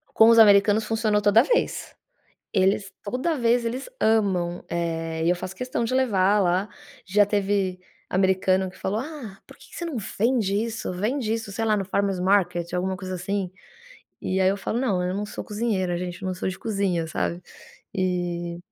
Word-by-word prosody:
Com 225 Hz, -, +7 dB
os 230 Hz, -, +6 dB
americanos 205 Hz, 0 st, +6 dB
funcionou 220 Hz, -2 st, +1 dB
toda 205 Hz, +2 st, +6 dB
vez. 475 Hz, -, -1 dB, 0.6 s
Eles 195 Hz, +1 st, +2 dB
toda 255 Hz, +10 st, -1 dB
vez, 235 Hz, -1 st, +2 dB
eles 245 Hz, +3 st, -3 dB
amam. 190 Hz, -6 st, +1 dB
Eh, 165 Hz, -1 st, -2 dB
e -, -, +4 dB
eu 180 Hz, -, +2 dB
faço 185 Hz, +1 st, -6 dB
questão 250 Hz, 0 st, -2 dB
de 230 Hz, -, -2 dB
levar 210 Hz, -6 st, +3 dB
lá. 185 Hz, +2 st, +1 dB, 0.4 s
Já 205 Hz, +2 st, +3 dB
teve 200 Hz, -2 st, 0 dB, 0.3 s
americano 190 Hz, 0 st, +2 dB
que -, -, -17 dB
falou: 200 Hz, +3 st, -2 dB
“Ah, 260 Hz, -8 st, -8 dB
por -, -, -15 dB
que -, -, -17 dB
que -, -, -12 dB
você 345 Hz, -, -4 dB
não 330 Hz, -5 st, -4 dB, 0.2 s
vende 225 Hz, -3 st, +2 dB
isso? 220 Hz, -1 st, -2 dB
Vende 220 Hz, +5 st, -1 dB
isso, 225 Hz, -3 st, -5 dB
sei 225 Hz, +3 st, -2 dB
lá, 215 Hz, -1 st, +3 dB
no 195 Hz, -, -1 dB
Farmers 195 Hz, 0 st, 0 dB
Market", 180 Hz, -2 st, +1 dB
alguma 185 Hz, +1 st, -1 dB
coisa 185 Hz, 0 st, -6 dB
assim. 190 Hz, +1 st, -2 dB, 0.7 s
E 190 Hz, +1 st, -1 dB
aí 185 Hz, -, +4 dB
eu 195 Hz, -, +1 dB
falo: 210 Hz, +3 st, -3 dB
“Não. 200 Hz, -9 st, +1 dB
Eu 180 Hz, +1 st, -1 dB
não 205 Hz, +1 st, -3 dB
sou -, -, -7 dB
cozinheira, 205 Hz, -5 st, -1 dB
gente. 180 Hz, +1 st, -5 dB
Não 185 Hz, -1 st, -2 dB
sou 185 Hz, -, -3 dB
de 185 Hz, -, -5 dB
cozinha, 195 Hz, -6 st, -1 dB
sabe?”. 170 Hz, +2 st, -2 dB, 0.5 s
E 175 Hz, -2 st, -2 dB
195 Hz, 185 wpm, -24 LUFS, 185-220 Hz, 0.7 s, Com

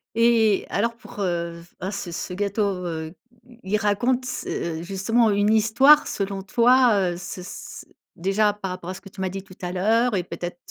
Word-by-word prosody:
Et 230 Hz, -3 st, +3 dB
alors 230 Hz, +3 st, 0 dB
pour, 230 Hz, -, -13 dB
heu, 170 Hz, -2 st, -2 dB, 0.2 s
ah 190 Hz, +2 st, -3 dB
ce 195 Hz, -4 st, -5 dB
ce 180 Hz, -, -5 dB
gâteau, 200 Hz, +2 st, -1 dB, 0.2 s
heu, 160 Hz, -1 st, -4 dB, 0.3 s
i 240 Hz, -1 st, -18 dB
il -, -, +5 dB
raconte 240 Hz, +5 st, +1 dB
s 255 Hz, -, -4 dB
heu, 165 Hz, 0 st, -3 dB
justement 210 Hz, +5 st, +1 dB
une 205 Hz, +2 st, +3 dB
histoire 235 Hz, +8 st, +6 dB
selon 195 Hz, -1 st, -3 dB
toi, 245 Hz, +3 st, +4 dB, 0.2 s
heu, 175 Hz, -, -7 dB
ce 180 Hz, +1 st, -7 dB
s 180 Hz, -, -9 dB, 0.3 s
déjà, 195 Hz, +4 st, +2 dB
par 195 Hz, -3 st, -5 dB
rapport 185 Hz, -1 st, -7 dB
à -, -, -3 dB
ce -, -, -9 dB
que -, -, -13 dB
tu 190 Hz, -, -9 dB
m'as 190 Hz, -, 0 dB
dit 195 Hz, +1 st, -5 dB
tout 185 Hz, -, -15 dB
à 180 Hz, 0 st, -3 dB
l'heure 220 Hz, +5 st, +2 dB
et 180 Hz, -, 0 dB
peut-être 175 Hz, 0 st, -6 dB
200 Hz, 200 wpm, -24 LUFS, 180-230 Hz, 0.3 s, histoire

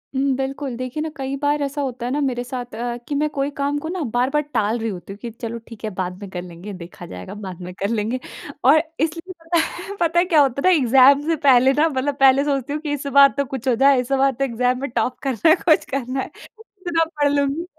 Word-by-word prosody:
हुँ, 265 Hz, -, +1 dB
बिल्कुल। 270 Hz, 0 st, -4 dB
देखिए 255 Hz, +4 st, -4 dB
न 320 Hz, -, -3 dB
कई 270 Hz, 0 st, -3 dB
बार 290 Hz, +1 st, 0 dB
ऐसा 280 Hz, +1 st, -2 dB
होता 255 Hz, -3 st, -4 dB
है 250 Hz, -, -2 dB
न 290 Hz, +1 st, 0 dB
मेरे 245 Hz, -2 st, -2 dB
साथ 245 Hz, -1 st, -6 dB
अ, 240 Hz, +1 st, -3 dB
कि 290 Hz, -, -2 dB
मैं 300 Hz, +1 st, +1 dB
कोई 280 Hz, -1 st, -2 dB
काम 285 Hz, +1 st, 0 dB
को 315 Hz, -, -6 dB
न 360 Hz, -3 st, -3 dB
बार-बार 260 Hz, +5 st, +1 dB
टाल 220 Hz, +1 st, +1 dB
रही 225 Hz, 0 st, -2 dB
हूँ 185 Hz, -3 st, -5 dB
क्योंकि 200 Hz, +4 st, -7 dB
चलो 230 Hz, +1 st, -6 dB
ठीक 230 Hz, -1 st, -12 dB
है 215 Hz, -, -2 dB
बाद 180 Hz, 0 st, -3 dB
में 200 Hz, -, -7 dB
कर 180 Hz, -1 st, -5 dB
लेंगे। 180 Hz, +3 st, -9 dB
देखा 175 Hz, -1 st, -10 dB
जाएगा 185 Hz, +3 st, -9 dB
बाद 185 Hz, -1 st, -7 dB
में 180 Hz, +1 st, -7 dB
कर 200 Hz, -, -1 dB
लेंगे। 230 Hz, +3 st, -1 dB, 0.4 s
और 300 Hz, +4 st, +6 dB, 0.2 s
इसलिए 335 Hz, +4 st, -2 dB
पता 340 Hz, +1 st, 0 dB
है 395 Hz, +4 st, -4 dB
पता 335 Hz, 0 st, +2 dB
है 350 Hz, -, +3 dB
क्या 330 Hz, -5 st, +4 dB
होता 275 Hz, -1 st, +1 dB
है 370 Hz, -, +6 dB
न -, -, +5 dB
एग्ज़ाम 265 Hz, +3 st, +6 dB
से 330 Hz, -, +2 dB
पहले 265 Hz, -3 st, +5 dB
न 295 Hz, +3 st, +3 dB
मतलब 275 Hz, +2 st, -1 dB
पहले 270 Hz, +1 st, +6 dB
सोचती 280 Hz, -1 st, -1 dB
हूँ 300 Hz, -, -3 dB
कि 295 Hz, -2 st, -3 dB
इस 285 Hz, 0 st, -4 dB
बार 280 Hz, 0 st, +7 dB
तो 280 Hz, -, +1 dB
कुछ 265 Hz, -1 st, -6 dB
हो 250 Hz, -, +3 dB
जाए 270 Hz, +1 st, +5 dB
इस 250 Hz, +2 st, -9 dB
बार 270 Hz, 0 st, +3 dB
तो 270 Hz, +2 st, -3 dB
एग्ज़ाम 250 Hz, 0 st, 0 dB
में 280 Hz, -, -3 dB
टॉप 250 Hz, +1 st, -1 dB
करना 270 Hz, +3 st, +2 dB
है, 320 Hz, -, +7 dB
कुछ 330 Hz, -3 st, +2 dB
करना 265 Hz, 0 st, -2 dB
है। -, -, -6 dB, 0.3 s
इतना 360 Hz, -7 st, -2 dB, 0.2 s
पढ़ 290 Hz, 0 st, +4 dB
लूँगी 285 Hz, +4 st, 0 dB
270 Hz, 255 wpm, -21 LUFS, 240-290 Hz, 0.4 s, बार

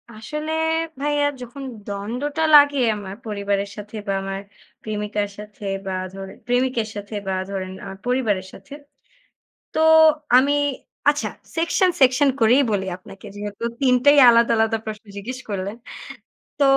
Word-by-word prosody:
আসলে 300 Hz, +8 st, -5 dB, 0.5 s
ভাইয়া 290 Hz, 0 st, +1 dB, 0.2 s
যখন 250 Hz, +3 st, -8 dB, 0.2 s
দ্বন্দ্বটা 245 Hz, +10 st, -3 dB
লাগে 285 Hz, -1 st, +7 dB, 0.2 s
আমার, 200 Hz, -2 st, -7 dB
পরিবারের 200 Hz, -1 st, -2 dB
সাথে 210 Hz, +1 st, -9 dB
বা 195 Hz, -, 0 dB
আমার 195 Hz, 0 st, -4 dB, 0.4 s
প্রেমিকার 210 Hz, -1 st, -2 dB
সাথে 210 Hz, 0 st, -10 dB, 0.2 s
বা 190 Hz, -, -3 dB, 0.2 s
ধরেন, 195 Hz, 0 st, -9 dB
প্রেমিকের 245 Hz, -2 st, +1 dB
সাথে 205 Hz, +1 st, -7 dB
বা 190 Hz, -, 0 dB, 0.2 s
ধরেন 185 Hz, -1 st, -4 dB
আমার 195 Hz, -, -8 dB
পরিবারের 220 Hz, -7 st, 0 dB
সাথে। 275 Hz, -, -13 dB, 1.0 s
তো -, -, -1 dB, 0.6 s
আমি 275 Hz, +3 st, +4 dB, 0.6 s
আচ্ছা, 295 Hz, 0 st, 0 dB, 0.3 s
সেকশন, 335 Hz, +3 st, +2 dB
সেকশন 265 Hz, +2 st, +5 dB
করেই 245 Hz, +5 st, +5 dB
বলি 195 Hz, -2 st, 0 dB
আপনাকে, 195 Hz, +2 st, -14 dB
যেহেতু 205 Hz, +1 st, -7 dB, 0.2 s
৩ 255 Hz, -2 st, +4 dB
টাই 290 Hz, 0 st, +7 dB
আলাদা, 235 Hz, 0 st, +4 dB
আলাদা 225 Hz, 0 st, +2 dB
প্রশ্ন 215 Hz, 0 st, -7 dB
জিজ্ঞেস 250 Hz, +6 st, -6 dB
করলেন। 200 Hz, +1 st, -3 dB, 0.8 s
তো -, -, +4 dB
220 Hz, 135 wpm, -22 LUFS, 200-265 Hz, 1.0 s, লাগে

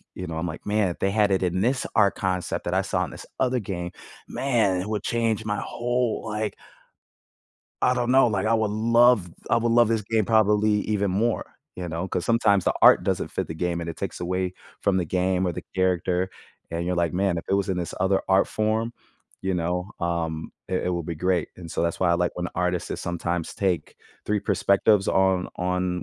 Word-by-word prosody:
you 90 Hz, -, -5 dB
know, 80 Hz, -1 st, -5 dB
I'm 90 Hz, +2 st, -2 dB
like, 80 Hz, -, -7 dB
"Man, 105 Hz, -2 st, +1 dB
if 85 Hz, -, -6 dB
they 95 Hz, -, +1 dB
had 105 Hz, -1 st, +3 dB
it 95 Hz, -1 st, +2 dB
in 90 Hz, +1 st, 0 dB
this 130 Hz, +4 st, +1 dB
art 100 Hz, -, +4 dB
concept 95 Hz, -2 st, -2 dB
that -, -, -1 dB
I -, -, +3 dB
saw -, -, -1 dB
in -, -, -10 dB
this -, -, -10 dB
other 130 Hz, -1 st, +2 dB
game, 90 Hz, -3 st, -4 dB, 0.4 s
man, 110 Hz, -9 st, +1 dB
it 100 Hz, -, -5 dB
would 105 Hz, -, -1 dB
change 115 Hz, -2 st, 0 dB
my 105 Hz, 0 st, -1 dB
whole, 120 Hz, -1 st, -1 dB
like" 105 Hz, -1 st, -2 dB, 1.3 s
"I 125 Hz, -, +4 dB
don't 125 Hz, 0 st, 0 dB
know, 130 Hz, -1 st, +6 dB
like, 105 Hz, -2 st, 0 dB
I 115 Hz, -, +3 dB
would 110 Hz, -2 st, +1 dB
love 115 Hz, -3 st, +4 dB, 0.2 s
I -, -, +5 dB
would 115 Hz, 0 st, +1 dB
love 120 Hz, -1 st, +6 dB
this 110 Hz, -2 st, +1 dB
game 110 Hz, +1 st, +1 dB
probably 105 Hz, -1 st, +3 dB
even 100 Hz, -2 st, +1 dB
more," 115 Hz, +4 st, +1 dB, 0.3 s
you 90 Hz, -1 st, -4 dB
know? 85 Hz, +4 st, -3 dB
'Cause 90 Hz, -, -2 dB
sometimes 100 Hz, -5 st, +3 dB
the -, -, +2 dB
art -, -, +7 dB
doesn't -, -, -1 dB
fit -, -, -2 dB
the 80 Hz, -, -6 dB
game, 85 Hz, +1 st, -1 dB
and 85 Hz, -, -5 dB
it 85 Hz, -, -5 dB
takes -, -, -4 dB
away 90 Hz, +1 st, -1 dB, 0.3 s
from 100 Hz, -2 st, +2 dB
the 90 Hz, -, +1 dB
game, 90 Hz, +2 st, 0 dB
or 85 Hz, -, 0 dB
the -, -, -6 dB
character, 90 Hz, 0 st, +1 dB, 0.4 s
and 85 Hz, +1 st, -2 dB
you're 90 Hz, 0 st, -1 dB
like, 85 Hz, -2 st, +1 dB
"Man, 95 Hz, -1 st, +1 dB
if -, -, -6 dB
it 95 Hz, -, +2 dB
was 100 Hz, 0 st, 0 dB
in 95 Hz, -, 0 dB
this 85 Hz, -1 st, -3 dB
other 95 Hz, +1 st, +2 dB
art 95 Hz, +1 st, +4 dB
form," 110 Hz, +2 st, 0 dB, 0.5 s
you 95 Hz, -1 st, 0 dB
know, 90 Hz, +3 st, -2 dB
um, 80 Hz, -2 st, -2 dB, 0.2 s
"it 90 Hz, -1 st, -1 dB
it -, -, +1 dB
would 85 Hz, -2 st, -4 dB
be 85 Hz, -, -3 dB
great." 90 Hz, +1 st, 0 dB
And 85 Hz, -3 st, -9 dB
so -, -, -2 dB
that's 85 Hz, +1 st, -1 dB
why 90 Hz, -2 st, +3 dB
I -, -, +4 dB
like 90 Hz, 0 st, 0 dB
when 90 Hz, -, -3 dB
the -, -, -8 dB
artists, 90 Hz, -1 st, 0 dB
they -, -, -3 dB
sometimes 85 Hz, -1 st, -3 dB
take 95 Hz, -4 st, -1 dB, 0.3 s
3 105 Hz, -1 st, +1 dB
perspectives 100 Hz, 0 st, +3 dB
on 95 Hz, -1 st, +2 dB
on 90 Hz, 0 st, -1 dB
95 Hz, 225 wpm, -25 LUFS, 90-110 Hz, 1.3 s, art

